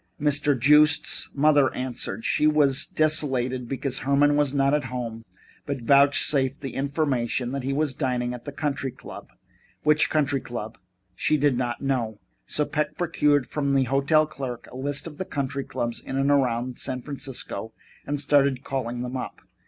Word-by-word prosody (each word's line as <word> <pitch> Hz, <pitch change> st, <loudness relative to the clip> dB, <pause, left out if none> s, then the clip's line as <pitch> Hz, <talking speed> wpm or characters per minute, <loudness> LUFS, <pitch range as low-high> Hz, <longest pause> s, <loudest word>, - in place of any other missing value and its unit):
Mr. 145 Hz, -2 st, +2 dB
Joost's 150 Hz, +4 st, +4 dB
mother 145 Hz, -2 st, +4 dB
answered. 125 Hz, -4 st, -4 dB
She 150 Hz, -, +2 dB
was 145 Hz, -3 st, +2 dB
desolated 130 Hz, -5 st, +1 dB
because 135 Hz, -1 st, -2 dB
Herman 145 Hz, +1 st, +3 dB
was 145 Hz, -2 st, +2 dB
not 140 Hz, 0 st, +2 dB
at 150 Hz, -2 st, +1 dB
home, 120 Hz, -3 st, -5 dB, 0.5 s
but 140 Hz, -4 st, -3 dB
vouchsafed 140 Hz, +1 st, +3 dB
the 135 Hz, -2 st, -5 dB
information 135 Hz, -4 st, -1 dB
that 140 Hz, 0 st, -3 dB
he 135 Hz, +2 st, -2 dB
was 145 Hz, 0 st, 0 dB
dining 125 Hz, -3 st, -1 dB
at 120 Hz, -1 st, -9 dB
the 145 Hz, -, -5 dB
country 140 Hz, -2 st, -2 dB
club. -, -, -11 dB, 0.5 s
Which 150 Hz, 0 st, +3 dB
country 140 Hz, -3 st, +1 dB
club? 110 Hz, -2 st, -7 dB, 0.3 s
She 155 Hz, +11 st, +1 dB
did 145 Hz, -2 st, +2 dB
not 120 Hz, -1 st, -2 dB
know. 125 Hz, -6 st, -1 dB, 0.3 s
So 150 Hz, -, 0 dB
Peck 150 Hz, 0 st, -2 dB
procured 150 Hz, -6 st, +2 dB
from 140 Hz, 0 st, -1 dB
the 135 Hz, -, +4 dB
hotel 140 Hz, +4 st, +3 dB
clerk 130 Hz, -5 st, -6 dB
a -, -, -11 dB
list 140 Hz, +2 st, -3 dB
of 155 Hz, -3 st, -9 dB
the 185 Hz, -, -2 dB
country 140 Hz, -6 st, -3 dB
clubs 120 Hz, -1 st, -3 dB
in 135 Hz, -, -5 dB
and 135 Hz, +1 st, +2 dB
around 125 Hz, -3 st, 0 dB
San 130 Hz, -2 st, -3 dB
Francisco 135 Hz, -5 st, -6 dB, 0.3 s
and 145 Hz, 0 st, -3 dB
started 140 Hz, -2 st, +2 dB
calling 125 Hz, -2 st, -3 dB
them 125 Hz, +1 st, -5 dB
up. 130 Hz, -, -6 dB
135 Hz, 170 wpm, -25 LUFS, 125-145 Hz, 0.5 s, Joost's